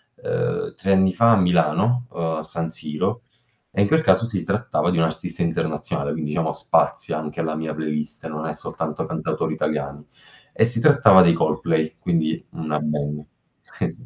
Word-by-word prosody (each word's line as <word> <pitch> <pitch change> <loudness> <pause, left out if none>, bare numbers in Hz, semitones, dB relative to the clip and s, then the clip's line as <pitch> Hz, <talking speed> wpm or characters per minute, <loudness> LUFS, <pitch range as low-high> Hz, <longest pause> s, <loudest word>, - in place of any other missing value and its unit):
uhm, - - -2
3 100 - -1
anni 95 -1 +4
fa 115 +3 +5
a - - +7
Milano, 90 +8 +2
uhm, 80 -1 -2
a 80 - -4
San 80 +1 -4
Siro, 75 -1 -3 0.5
e 100 - 0
in 100 - +4
quel 160 +9 +3
caso 115 - +3
si 100 -7 -3
trattava 95 -3 0
di 90 - 0
un 80 - +4
artista 80 +1 -3
internazionale, 70 -3 -2
quindi 75 0 -3
diciamo 80 +1 0
spazia - - 0
anche 75 +1 -4
la 80 -1 -2
mia 80 0 -3
playlist, 75 0 -4
non 80 0 -5
è 75 - -3
soltanto - - -5
cantautori - - -2
italiani. 75 -1 -3 0.5
E - - +4
si 115 -1 -1
trattava 130 -9 +7
dei 85 -1 +5
Coldplay, 80 -1 0
quindi 80 -2 -1
una 75 -2 -3
band. 75 0 -3 0.5
Eh - - 0
sì. - - -16
80 Hz, 180 wpm, -22 LUFS, 75-95 Hz, 0.5 s, a